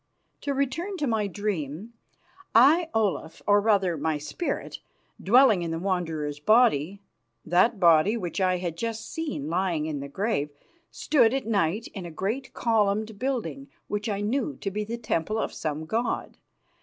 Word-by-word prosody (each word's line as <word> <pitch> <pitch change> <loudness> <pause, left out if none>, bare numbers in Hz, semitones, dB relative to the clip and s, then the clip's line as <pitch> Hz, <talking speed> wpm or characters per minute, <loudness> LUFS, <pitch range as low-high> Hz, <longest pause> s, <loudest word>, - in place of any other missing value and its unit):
To 280 -1 -2
return 335 +9 -2
to 300 - -1
my 220 -5 0
dream. 195 0 -4 0.6
I, 315 +8 +6
Olaf, 200 -7 -1
or, 205 0 +4
rather, 200 -5 +2
my 155 +1 -1
spirit, 155 - -4 0.4
dwelling 225 -2 +5
in 170 - -3
the 165 - -2
Wanderer's 165 -5 -2
body, 200 - +3 0.4
that 195 +6 +3
body 170 +5 +5
which 185 -1 -3
I 185 -1 +2
had 175 -2 -4
just 225 +1 -4
seen 300 - -3
lying 170 -2 0
in 155 -2 -3
the 140 - -6
grave, 190 -4 -1 0.4
stood 250 -5 +2
at 270 - -2
night 205 0 0
in 190 -4 -6
a - - -7
great 210 - -3
columned 215 -2 +1
building, 270 +1 -3 0.2
which 210 +2 -3
I 200 -1 -2
knew 270 +7 -1
to 195 - -2
be 210 +2 -2
the 230 +3 -5
temple 215 -2 -1
of - - -2
some 155 0 -4
god. 230 +9 -2
205 Hz, 160 wpm, -26 LUFS, 170-235 Hz, 0.6 s, I